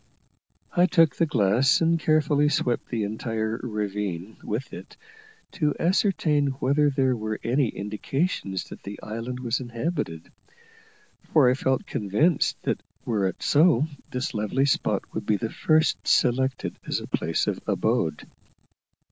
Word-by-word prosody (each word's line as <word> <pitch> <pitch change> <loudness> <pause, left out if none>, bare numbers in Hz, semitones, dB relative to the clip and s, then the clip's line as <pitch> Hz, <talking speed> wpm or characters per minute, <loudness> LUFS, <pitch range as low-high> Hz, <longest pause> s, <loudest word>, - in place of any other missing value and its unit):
I 175 +1 +5
took 165 -7 +4
the 165 - +1
glass, 125 +3 +3
and 165 0 +2
carefully 150 -2 +3
swept 125 -4 -1
the 115 -3 -1
entire 110 +1 -2
ravine 105 -4 -4
with 120 +6 -4
it - - -10 0.5
to 155 -7 0
ascertain 165 -5 +2
whether 140 +3 +2
there 130 -2 +1
were 110 -1 -4
any 125 +2 +2
indications 105 - -2
that - - -10
the 100 +1 -8
island 115 +4 -5
was 120 0 -1
inhabited, 120 - -4 1.0
for 135 -5 +5
I - - +3
felt 130 -1 0
convinced 125 - +1
that - - -1 0.2
were 105 -5 +1
it 95 - -5
so 150 -2 +4 0.2
this 130 +3 -3
lovely 110 +5 0
spot 140 - +1
would - - -5
be 105 - +3
the 110 +2 -4
first 155 0 +1
selected 130 +2 +1
as - - 0
a - - -7
place 80 - -1
of - - -2
abode. 80 -2 0
125 Hz, 140 wpm, -25 LUFS, 110-150 Hz, 1.0 s, I